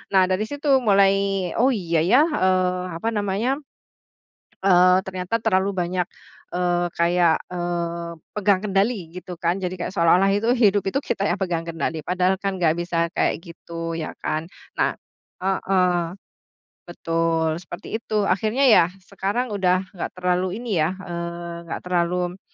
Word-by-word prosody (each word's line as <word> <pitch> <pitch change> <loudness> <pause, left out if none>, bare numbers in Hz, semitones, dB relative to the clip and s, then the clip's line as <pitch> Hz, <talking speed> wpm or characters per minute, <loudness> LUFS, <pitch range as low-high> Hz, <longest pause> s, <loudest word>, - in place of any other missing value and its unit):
Nah, 190 - +7
dari 205 +4 0
situ 285 -1 +2
mulai, 195 -4 +2
“Oh 255 +2 +4
iya 170 -5 0
ya, 210 - +5
eee, 185 - +1
apa 225 +8 -2
namanya, 210 +6 -1 1.0
eee, 180 -1 +6
ternyata 190 +4 -3
terlalu 190 0 +1
banyak 180 0 -1 0.5
eee, 175 0 +1
kayak, 170 -1 +3
eee, 170 -1 -3 0.2
pegang 200 -2 +1
kendali 195 -3 0
gitu 180 +1 -8
kan.” 170 +2 -1
Jadi 185 -1 -3
kayak 175 -1 -4
seolah-olah 180 +2 +4
itu 220 +5 +2
hidup 205 -5 +3
itu 275 +9 0
kita 200 - -1
yang 180 - 0
pegang 170 -3 -1
kendali, 165 -1 -3
padahal 185 +1 +1
kan 195 0 -2
enggak 165 0 +3
bisa 170 -1 -1
kayak 165 - 0
gitu, 165 -1 -6
ya 155 - -5
kan? 155 +1 -2 0.3
Nah - - +2 0.5
heeh. 180 -2 +1 0.7
Betul, 165 -1 0
seperti 175 +5 -6
itu 215 -2 -1
akhirnya. 215 +7 +1
Ya 180 -6 +6 0.2
sekarang 200 +6 -2
udah 185 -2 +2
enggak 180 - -5
terlalu 180 +1 0
ini, 210 -8 -1
ya, 160 +4 +1
eee, 170 -1 -6
engak - - -5
terlalu 180 +1 0
185 Hz, 145 wpm, -23 LUFS, 170-200 Hz, 1.0 s, Nah